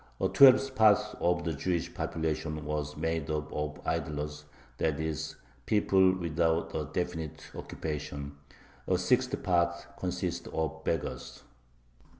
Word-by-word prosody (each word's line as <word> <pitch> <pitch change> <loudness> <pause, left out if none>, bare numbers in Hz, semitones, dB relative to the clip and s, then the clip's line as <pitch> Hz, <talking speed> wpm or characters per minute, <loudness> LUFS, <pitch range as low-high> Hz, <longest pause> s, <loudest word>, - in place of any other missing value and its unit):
A - - +2
twelfth 135 0 +7
part 110 -5 +6 0.2
of 90 0 +1
the 85 - -1
Jewish 85 +3 -2
population 80 -1 -2
was 75 -1 -3
made 80 -1 -1
up 75 0 -2
of 75 0 -3
"idlers," 75 0 -3 0.3
that 80 -2 +1
is, 80 -2 -3 0.3
people 95 -3 +4
without 80 -1 0
a 75 - -2
definite 80 -3 -3
occupation. 70 -2 -5 0.5
A - - +3
sixtieth - - +1
part 85 -1 +2 0.2
consisted 90 -1 -3
of 80 0 -2
beggars. 80 -4 -3
80 Hz, 125 wpm, -30 LUFS, 75-90 Hz, 0.5 s, twelfth